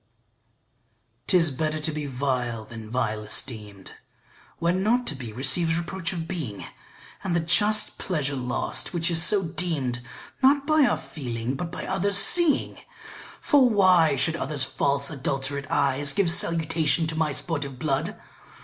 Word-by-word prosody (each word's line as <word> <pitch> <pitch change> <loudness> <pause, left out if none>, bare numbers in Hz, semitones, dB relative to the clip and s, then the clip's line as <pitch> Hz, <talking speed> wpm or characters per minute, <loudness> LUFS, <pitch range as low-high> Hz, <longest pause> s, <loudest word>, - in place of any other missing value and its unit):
'TIS 165 -4 +2
better 155 +3 -4
to 155 +1 -3
be 150 -1 -7
vile 125 -4 -5
than 110 -2 -11
vile 110 -3 -4
esteem'd, 105 -3 +2 0.7
When 175 +2 -3
not 240 +5 -2
to - - 0
be 125 -4 -10
receives 140 +8 +2
reproach 175 +1 -5
of 165 -3 -8
being, 150 - -7 0.6
And 185 -3 -4
the - - 0
just 205 +6 +3
pleasure 150 -7 -3
lost 125 +6 0
which 170 +1 0
is 165 -1 +5
so 195 +3 +6
deem'd 150 -8 -3 0.4
Not 275 +1 +1
by 310 -1 +1
our 240 - -1
feeling 120 -4 -7
but 165 +5 -8
by 175 - -7
others' 195 +1 -1
seeing: 325 - +5 0.6
For 275 -4 +1
why 185 -8 +2
should 160 +4 +1
others 140 -2 -3
false 140 +1 +1
adulterate 140 0 -5
eyes 140 0 0
Give 195 -4 +1
salutation 165 -1 +3
to 160 0 -2
my 160 -1 -2
sportive 140 -3 -3
blood? 135 0 -3
155 Hz, 150 wpm, -22 LUFS, 130-180 Hz, 0.7 s, so